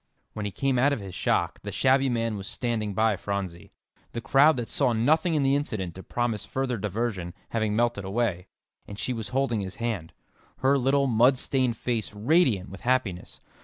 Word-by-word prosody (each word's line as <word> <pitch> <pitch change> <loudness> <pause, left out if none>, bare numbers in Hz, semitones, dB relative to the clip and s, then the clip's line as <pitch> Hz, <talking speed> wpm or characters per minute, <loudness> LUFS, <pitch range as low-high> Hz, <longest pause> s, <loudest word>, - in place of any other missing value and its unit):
When 105 - -4
he 100 - -2
came 135 +3 0
out 140 +3 +4
of 140 - -2
his 95 -3 -8
shock, - - 0
the - - -6
shabby 135 +1 +3
man 115 -2 -1
was 100 -1 -6
standing 110 -5 -2
by 110 0 +3
Phronsie, 95 -4 -5 0.4
the 115 - -2
crowd 135 +5 +4
that 120 -2 -3
saw 130 -4 +1
nothing 155 +9 +2
in 145 - +2
the 135 +1 +3
incident 110 - -2
to 95 - -9
promise 115 -1 -2
further 130 -3 -2
diversion, 100 -4 -3
having 110 -2 0
melted 120 -3 +1
away, 95 -2 -1 0.4
and 100 - -8
she 125 - -1
was 110 -3 -4
holding 125 -2 0
his 95 -1 -5
hand, 110 -9 -3 0.4
her 135 +1 +3
little, 135 +2 +2
mud 125 +1 +4
stained 130 -3 0
face 115 -4 -2
radiant 115 - +2
with 95 -2 -10
happiness. 120 -8 -1
115 Hz, 190 wpm, -26 LUFS, 100-130 Hz, 0.4 s, out